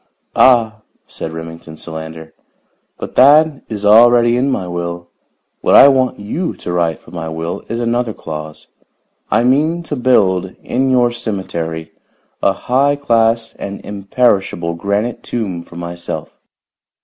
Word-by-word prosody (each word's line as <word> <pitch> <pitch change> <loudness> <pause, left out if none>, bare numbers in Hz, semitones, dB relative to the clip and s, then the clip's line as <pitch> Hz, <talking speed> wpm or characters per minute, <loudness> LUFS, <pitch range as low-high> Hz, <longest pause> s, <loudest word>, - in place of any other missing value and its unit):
"Ah!" 115 -4 +4 0.2
said 80 - -7
Remington 80 -1 -9
Solander. 80 0 -8 0.6
"But - - -7
that 150 +2 +5
is 105 -2 -4
already 120 +2 +6
in 130 +3 +1
my 95 -9 -2
will. 85 0 -5 0.5
What - - +3
I 140 - +9
want 130 -2 +1
you 155 - -3
to 90 - -6
write 85 -2 0
for - - -17
my 85 -2 -5
will, 80 +2 -4
is 115 - -3
another 120 0 0
clause. 75 -5 -8 0.6
I - - +2
mean 155 +7 +2
to 155 - -4
build, 95 -8 +2
in 130 +1 0
your 125 -2 +3
cemetery, 85 -8 -4 0.5
a 100 - +3
high 135 +8 +1
class 115 -4 +1
and 100 0 -6
imperishable 100 -4 0
granite 100 +7 -2
tomb 100 -8 -4
for 85 - -15
myself. 85 0 -6
105 Hz, 135 wpm, -16 LUFS, 85-125 Hz, 0.6 s, I